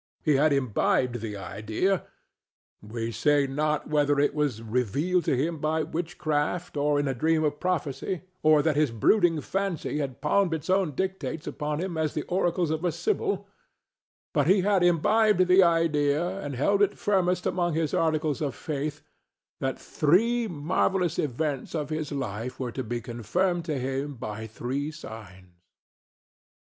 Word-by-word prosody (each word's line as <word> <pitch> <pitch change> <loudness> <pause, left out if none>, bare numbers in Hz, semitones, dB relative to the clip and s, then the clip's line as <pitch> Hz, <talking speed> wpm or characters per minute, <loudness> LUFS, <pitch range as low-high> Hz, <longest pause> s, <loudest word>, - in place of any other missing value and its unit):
He 155 - +3
had 150 +2 +4
imbibed 125 -2 +1
the 105 -2 -5
idea—we 110 - -5
say 145 +6 +2
not 150 +2 -1
whether 145 -1 +2
it 145 - +2
were 150 -1 +1
revealed 140 - 0
to 130 - +1
him 160 +4 -1
by 155 +1 0
witchcraft 160 0 -2
or 145 0 +2
in 145 - 0
a 135 - 0
dream 155 +5 +1
of 150 -1 -1
prophecy, 180 0 -2 0.2
or 155 -1 +5
that 160 -2 +2
his 150 -1 +3
brooding 165 - +3
fancy 190 -5 -2
had 135 -4 -4
palmed 195 -5 +2
its 160 +3 -3
own 190 -5 +2
dictates 165 -3 -3
upon 150 -1 -3
him 175 -2 -3
as 155 -2 -1
the 150 - -1
oracles 175 -2 0
of 160 +1 -2
a 175 - +2
sybil, 410 - -1 0.9
but 145 -2 +2
he 190 +2 +5
had 195 0 +2
imbibed 185 +3 +4
the 185 +1 +6
idea, 165 +1 +2
and 145 -2 -5
held 200 +10 +2
it 205 0 +2
firmest 180 -3 +1
among 175 -3 0
his 160 -2 0
articles 155 -3 +1
of 145 -3 -2
faith—that 145 -2 -6
three 225 +10 +2
marvellous 175 +2 0
events 145 +1 -2
of 150 -1 -3
his 155 -1 -3
life 125 -3 -4
were 125 -2 -3
to 130 - -4
be 120 +1 -3
confirmed 165 - -1
to 155 -4 -2
him 135 +2 -3
by 110 -1 -6
three 130 +6 -3
signs. 95 - -11
150 Hz, 155 wpm, -27 LUFS, 135-175 Hz, 0.9 s, the